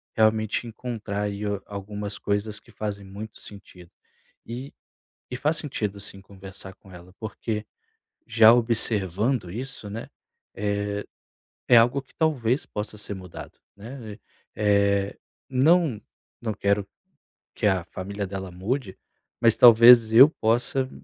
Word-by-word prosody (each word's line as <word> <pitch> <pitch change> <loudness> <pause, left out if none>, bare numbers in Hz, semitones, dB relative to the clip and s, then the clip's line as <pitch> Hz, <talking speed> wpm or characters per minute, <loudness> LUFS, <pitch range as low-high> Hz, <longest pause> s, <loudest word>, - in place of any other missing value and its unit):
realmente 110 +1 +1
encontrar 110 -3 -5
aí 100 0 -4 0.2
algumas 100 0 -6
coisas 105 +1 -2
que - - -25
fazem 100 -2 -5
muito 105 +3 -9
sentido. 95 -3 -13 0.6
E 125 +5 -7 0.6
e 125 - -4
faz 150 +5 0
sentido, 105 -9 -4
sim, 100 -1 -6
conversar 95 -1 -9
com 95 - -19
ela 90 0 -13
porque, 110 0 -4 0.6
já 115 -1 +7
observando 110 -2 +1
isso, 115 0 -6
né, 110 +3 -7 0.5
é 100 0 -2 0.6
é 120 - +7
algo 120 +4 +4
que 135 - -29
talvez 135 -6 0
possa 105 0 -6
ser 105 - -5
mudado, 90 -3 -10 0.2
né. 110 0 -9 0.4
Eh. 100 -1 +2 0.3
Não 140 -2 +3 0.4
não 110 -2 -2
quero 100 0 0 0.7
que 105 - +1
a 95 -3 +1
família 100 +2 -5
dela 95 -1 -6
mude, 95 +3 -3 0.4
mas 115 -2 +5
talvez 115 -1 +8
eu 130 +5 +10
possa 125 +1 0
105 Hz, 125 wpm, -25 LUFS, 100-120 Hz, 0.7 s, eu